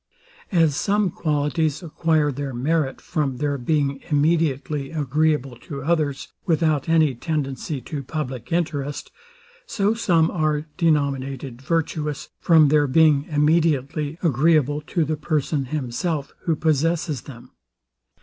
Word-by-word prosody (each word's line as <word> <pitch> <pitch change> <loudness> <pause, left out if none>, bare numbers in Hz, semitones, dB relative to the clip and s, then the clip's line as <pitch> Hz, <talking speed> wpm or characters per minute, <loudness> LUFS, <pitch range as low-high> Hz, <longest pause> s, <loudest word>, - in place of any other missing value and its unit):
As 165 -6 +3
some 200 +2 +1
qualities 150 0 -1
acquire 160 -2 +1
their 140 -1 -5
merit 145 +2 0
from 145 -6 -2
their 145 -1 -1
being 140 +1 0
immediately 150 -2 +1
agreeable 150 -3 0
to 140 +3 -8
others, 150 -3 0
without 160 -4 +1
any 160 -4 +4
tendency 140 0 -3
to 145 +4 -5
public 130 -3 -5
interest; 145 -4 -2 0.6
so 205 - +1
some 170 -8 +2
are 155 -2 0
denominated 140 -6 -1
virtuous 150 -1 -2
from 160 -4 +5
their 145 0 +3
being 150 0 +4
immediately 150 -1 +1
agreeable 150 -1 +3
to 170 -4 0
the 155 +1 -2
person 150 -2 -1
himself, 145 +2 -3
who 165 - +2
possesses 155 -2 0
them. 120 -5 -12
150 Hz, 120 wpm, -23 LUFS, 140-160 Hz, 0.6 s, from